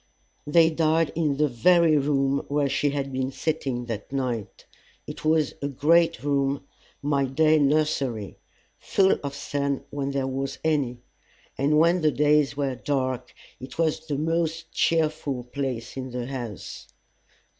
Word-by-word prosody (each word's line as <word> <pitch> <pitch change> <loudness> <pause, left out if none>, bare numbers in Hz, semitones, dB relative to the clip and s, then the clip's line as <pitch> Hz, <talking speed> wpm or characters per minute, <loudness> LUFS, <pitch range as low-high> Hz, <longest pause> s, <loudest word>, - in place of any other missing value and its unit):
They 160 +2 +5
died 160 0 +2
in 155 -4 0
the 150 +1 +3
very 165 +5 +4
room 140 -1 +1
where 145 0 +1
she 145 +1 +1
had 140 -1 -3
been 130 0 -1
sitting 135 -5 -2
that 115 -2 -6
night. 125 -6 -3 0.4
It - - -8
was 155 -1 +2
a 140 - -1
great 165 +5 +2
room, 140 -1 0 0.4
my 140 -1 +1
day 155 +4 +3
nursery, 140 -7 0 0.4
full 190 -1 +2
of 140 -1 -4
sun 140 -1 -2
when 140 -1 -2
there 140 -1 -1
was 135 +1 -3
any; 140 -6 0 0.5
and 145 +3 +2
when 170 +3 +4
the 155 - +4
days 150 +1 +2
were 140 -2 0
dark 130 -2 -2 0.3
it 130 - -10
was 160 -1 0
the 145 -3 -2
most 165 +1 -1
cheerful 155 -5 0
place 125 -2 -4
in 130 -1 -5
the 125 -1 -4
house. 120 -6 -7
140 Hz, 145 wpm, -25 LUFS, 135-155 Hz, 0.5 s, They